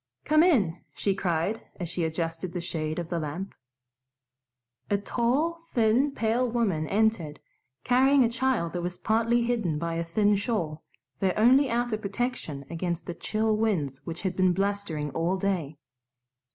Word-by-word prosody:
"Come 310 +1 +5
in!" 210 - +3 0.2
she 200 - 0
cried, 185 +2 -1
as 175 - -5
she 175 +1 -2
adjusted 165 +2 -3
the 180 - -2
shade 155 -2 -3
of 170 -2 -4
the 170 - -1
lamp. 165 +6 -5 1.4
A 205 - +3
tall, 265 +11 0
thin, 235 +5 +3
pale 240 -1 0
woman 200 -10 0
entered, 200 -8 +1 0.4
carrying 265 +2 +5
a - - +4
child 240 -8 0
that 175 - -2
was 175 +1 -3
partly 230 +4 +2
hidden 225 -10 0
by 170 +1 -2
a 165 0 -1
thin 205 +5 +2
shawl, 195 -7 -2 0.4
their 190 -2 +1
only 260 +5 +5
outer 235 -2 0
protection 200 - -3
against 170 0 -3
the 175 - -4
chill 215 +5 0
winds 175 -12 0
which 165 +2 -6
had 190 -2 -1
been 185 -1 +3
blustering 195 -6 -1
all 165 +7 0
day. 180 -7 -2
195 Hz, 155 wpm, -27 LUFS, 170-230 Hz, 1.4 s, Come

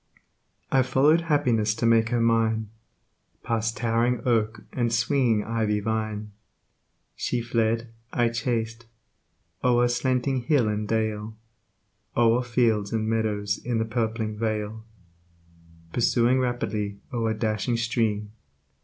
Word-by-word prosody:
I 135 - +5
followed 135 +6 +3
happiness 120 -10 +1
to 115 - -2
make 115 -1 +4
her 120 0 +1
mine, 115 -2 +1 0.7
Past 115 +1 -1
towering 120 +1 +1
oak 110 -2 +1
and 120 -2 0
swinging 115 -1 +2
ivy 110 -2 0
vine. 110 0 -3 0.8
She 125 - -1
fled, 115 0 -1 0.2
I 120 -1 +2
chased, 115 -1 -2 0.8
o'er 120 -1 +4
slanting 125 +1 0
hill 125 -2 +2
and 105 0 -2
dale, 110 -1 -2 0.8
O'er 120 +1 +4
fields 115 -4 +1
and 110 -1 -1
meadows, 105 -2 0
in 120 -1 -1
the 110 - 0
purpling 110 -1 -2
vale; 110 0 -3 1.1
Pursuing 120 +1 +3
rapidly 105 -5 -2 0.2
o'er 115 -2 0
dashing 110 +2 -1
stream. 110 -3 -1
115 Hz, 115 wpm, -25 LUFS, 110-120 Hz, 1.1 s, I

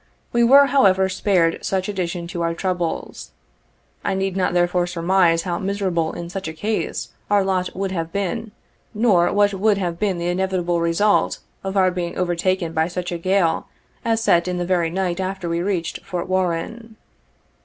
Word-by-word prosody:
We 235 0 +3
were, 275 +4 +7
however, 195 -9 +4
spared 180 -3 +1
such 190 -1 -1
addition 180 -3 -3
to 175 -2 -4
our 165 0 0
troubles. 180 -2 -3 0.7
I - - 0
need 190 -1 -1
not 185 -2 0
therefore 175 0 +2
surmise, 170 -1 +2
how 175 -2 -2
miserable 190 -5 -1
in 170 - -6
such 195 +1 -5
a 160 - -5
case, 210 +7 -2 0.2
our 205 -1 +4
lot 185 -1 -1
would 195 0 -2
have 165 -3 -3
been, 205 +4 -3 0.4
nor 205 -6 +3
what 205 0 +3
would 200 +1 +2
have 175 -3 -3
been 200 -4 0
the 170 0 -2
inevitable 175 -2 0
result 170 +5 +2 0.3
of 195 +1 -3
our 185 -1 +4
being 175 -1 -4
overtaken 175 -1 0
by 160 0 +1
such 180 0 -4
a 170 - -3
gale 185 -2 +1 0.4
as 225 -1 +1
set 170 -4 +3
in 180 0 -2
the 175 - -1
very 175 -2 +1
night 180 0 -2
after 190 -1 -3
we 170 0 -1
reached 180 -3 -2
Fort 180 -3 -4
Warren. 185 +5 -2
185 Hz, 175 wpm, -21 LUFS, 170-195 Hz, 0.7 s, were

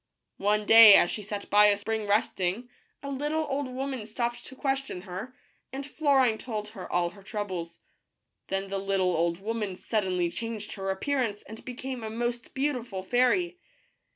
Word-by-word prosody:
One 210 +1 +1
day, 225 -2 +10
as 175 - +5
she 215 - -3
sat 205 0 -5
by 210 +1 +7
a 205 -1 +3
spring 220 +1 -3
resting, 200 +2 0 0.3
a 280 - -5
little 295 +3 -1
old 275 0 -2
woman 260 -3 -4
stopped 240 +1 -3
to 260 - -11
question 270 -7 -2
her, 190 +7 -7 0.4
and 270 +1 -5
Florine 275 -6 +2
told 215 -4 -5
her 205 -4 -9
all 175 -1 +1
her 200 - -15
troubles. 190 -5 -5 0.7
Then 195 0 -2
the 195 0 -2
little 195 -2 +1
old 170 +1 0
woman 210 -2 -3
suddenly 185 -4 -1
changed 225 +2 -5
her 195 -1 -4
appearance 220 +1 -1
and 220 +1 -11
became 255 -1 -6
a 220 - -4
most 240 +2 -3
beautiful 250 -8 -2
fairy. 345 - +2
220 Hz, 165 wpm, -28 LUFS, 195-255 Hz, 0.7 s, day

